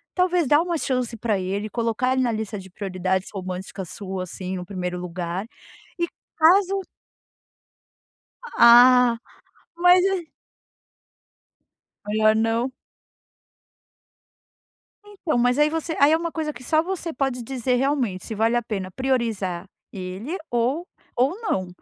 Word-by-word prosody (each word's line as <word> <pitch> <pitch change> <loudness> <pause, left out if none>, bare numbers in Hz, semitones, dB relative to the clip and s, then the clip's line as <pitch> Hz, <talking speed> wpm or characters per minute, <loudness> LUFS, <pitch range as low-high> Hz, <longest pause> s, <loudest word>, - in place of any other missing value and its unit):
talvez 360 -3 +2
dá 295 +3 +5
uma 345 -1 -1
chance 250 -5 -2
pra 215 -3 0
ele, 200 +3 -3
colocar 235 +2 0
ele 260 - +1
na 245 -2 +1
lista 220 -1 -4
de 190 0 -12
prioridades 190 -1 -2
romântica 185 0 -5
sua, 190 +1 -5
assim, 185 +1 -6
no 180 - -6
primeiro 180 -1 -4
lugar 180 +2 -4 0.5
e 345 - +1 0.3
caso 380 +4 +4 1.8
Ah, 245 0 +7 0.6
mas 360 +1 +5
é 380 -4 -1 1.8
Melhor 215 +1 +3
não? 225 +3 +1 2.3
Então 390 -9 -3
mas 245 +1 +2
aí 300 - +5
você 325 +1 -3
aí 285 +2 +6
é - - +6
primeira 335 0 -2
coisa 310 -2 -3
que 245 - -12
só 310 +5 +2
você 345 -2 -4
pode 270 -4 -1
dizer 250 0 -1
realmente 250 -8 0
se 220 - -5
vale 225 +3 +2
a 240 - +2
pena 200 -5 -4
priorizar 220 -8 -1 0.3
ele 195 - -5
ou 255 +9 0 0.3
ou 275 - +1
não. 190 - -1
240 Hz, 130 wpm, -23 LUFS, 195-305 Hz, 2.3 s, Ah